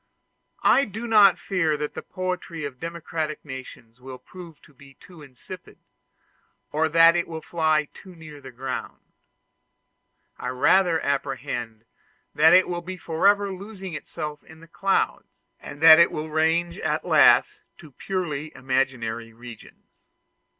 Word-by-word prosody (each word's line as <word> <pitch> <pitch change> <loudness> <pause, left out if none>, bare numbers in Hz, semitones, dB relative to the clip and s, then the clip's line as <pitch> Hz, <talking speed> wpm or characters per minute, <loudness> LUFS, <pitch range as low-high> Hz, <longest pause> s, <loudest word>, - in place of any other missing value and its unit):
I 275 - +4
do 220 +4 -7
not 210 -5 +5
fear 165 -6 -1
that 150 0 -4
the - - -6
poetry 180 -3 -5
of 130 -3 -8
democratic 165 -2 -5
nations 130 -3 -11
will 130 0 -9
prove 170 +4 -13
too 145 +4 -17
insipid, 145 +7 -13 0.9
or 160 +1 0
that 165 +2 +6
it 175 - -1
will 160 -1 -7
fly 155 -3 0
too 185 -2 -14
near 155 -3 -12
the 135 - -11
ground; 130 +1 -6 1.4
I - - -5
rather 165 +7 +2
apprehend 120 -5 -4 0.5
that 160 +2 +5
it 185 +1 +5
will 175 -1 -4
be 185 +2 -8
forever 200 +4 +1
losing 190 -1 -9
itself 150 0 -7
in 160 0 -16
the 165 - -16
clouds, 195 +4 -2 0.2
and 145 +1 -11
that 160 0 +10
it 170 - +5
will 155 0 -5
range 165 +3 0
at - - -2
last - - +4 0.2
to 155 -3 -15
purely 155 -2 -4
imaginary 130 -3 -2
regions. 120 -1 -14
160 Hz, 135 wpm, -24 LUFS, 135-175 Hz, 1.4 s, that